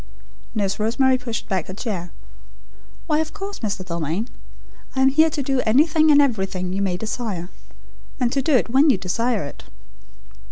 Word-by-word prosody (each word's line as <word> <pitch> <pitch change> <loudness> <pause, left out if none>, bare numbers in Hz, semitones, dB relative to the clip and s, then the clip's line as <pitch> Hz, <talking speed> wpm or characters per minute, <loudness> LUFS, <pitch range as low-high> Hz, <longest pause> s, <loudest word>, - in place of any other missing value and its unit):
Nurse 200 -2 -1
Rosemary 255 +4 +2
pushed 235 -3 -5
back 185 -4 -1
her 185 - -7
chair. 190 -6 -4 0.9
"Why 305 -2 +1
of 315 0 -3
course, 400 +1 -6
Mr. 200 -3 -3
Dalmain. 170 - -3 0.7
I 265 - +1
am 265 - +6
here 315 +4 +4
to 290 -2 -3
do 265 -1 +1
anything 310 +7 +4
and 290 -1 +7
everything 190 -9 0
you 195 - -1
may 185 -3 0
desire; 215 -5 -4 0.7
and 245 -2 +1
to 275 - +1
do 280 +2 +2
it 250 - +3
when 275 +5 +5
you 260 - +4
desire 225 +5 -1
it." 140 - -9
230 Hz, 170 wpm, -22 LUFS, 190-275 Hz, 0.9 s, and